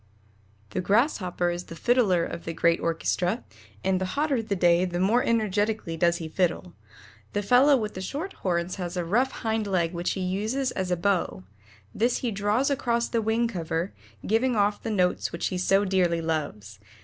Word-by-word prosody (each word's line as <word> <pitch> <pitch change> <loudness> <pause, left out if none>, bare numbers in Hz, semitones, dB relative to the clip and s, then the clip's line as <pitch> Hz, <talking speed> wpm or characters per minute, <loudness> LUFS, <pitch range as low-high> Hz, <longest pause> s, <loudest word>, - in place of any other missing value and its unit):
The - - -1
Grasshopper 185 - +1
is 175 +1 -5
the 165 - -9
fiddler 205 -5 +2
of 170 - -6
the 165 - -4
great 170 0 +3
orchestra, 170 -1 -1 0.4
and 185 -1 +1
the - - +1
hotter 290 -5 +1
the 215 -2 -2
day 175 -1 +4
the 175 -1 -2
more 215 +7 +3
energetically 215 -5 0
does 170 +1 +2
he 165 - -5
fiddle. 175 +1 -1 0.6
The 205 - -1
fellow 260 +6 +5
with 215 -3 -3
the 185 - -6
short 300 - -4
horns 175 0 -1
has 180 -1 -4
a 175 - -1
rough 240 +10 +2
hind 220 -2 -2
leg 175 -3 0
which 175 0 -1
he 190 - -4
uses 215 +9 -1
as 190 -1 -3
a 180 - +1
bow; 180 - 0 0.5
this 235 +2 +1
he 245 - -2
draws 210 +7 +1
across 235 -4 0
the 230 - 0
wing 225 +2 +1
cover, 170 -3 -3 0.3
giving 235 +3 +2
off 205 0 +1
the - - -4
notes 180 -4 +1
which 170 - -2
he 185 - -3
so 195 +2 +3
dearly 180 -3 +2
loves. 145 -11 -3
190 Hz, 185 wpm, -26 LUFS, 175-225 Hz, 0.6 s, fellow